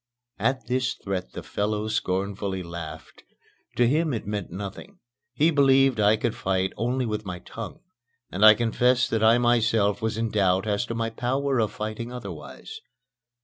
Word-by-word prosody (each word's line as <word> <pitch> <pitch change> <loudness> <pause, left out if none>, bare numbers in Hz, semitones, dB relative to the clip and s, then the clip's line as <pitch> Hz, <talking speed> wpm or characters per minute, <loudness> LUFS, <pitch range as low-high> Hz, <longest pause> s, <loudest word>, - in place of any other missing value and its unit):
At 130 -3 0
this 130 +2 0
threat 95 -2 -5
the - - -7
fellow 105 +1 -2
scornfully 100 -2 -2
laughed. 85 -2 -8 0.5
To 120 - +4
him 155 +3 +1
it 110 - -5
meant 105 -2 -4
nothing. 100 - -8 0.3
He 150 +7 +3
believed 135 -4 +4
I 105 +1 +4
could - - -1
fight 95 0 -1
only 125 +3 -1
with 105 -1 -3
my 90 -3 -5
tongue, 110 +4 -9 0.5
and 95 +3 -1
I 110 0 +10
confess 120 +2 +2
that 115 - -1
I 115 +2 +6
myself 115 -4 +2
was 110 0 -1
in 115 -1 -1
doubt 95 -1 +2
as 105 +2 -1
to 115 - -4
my 115 0 -2
power 130 +3 0
of 110 -2 +1
fighting 110 +3 -5
otherwise. 125 - -8
110 Hz, 165 wpm, -25 LUFS, 100-125 Hz, 0.5 s, I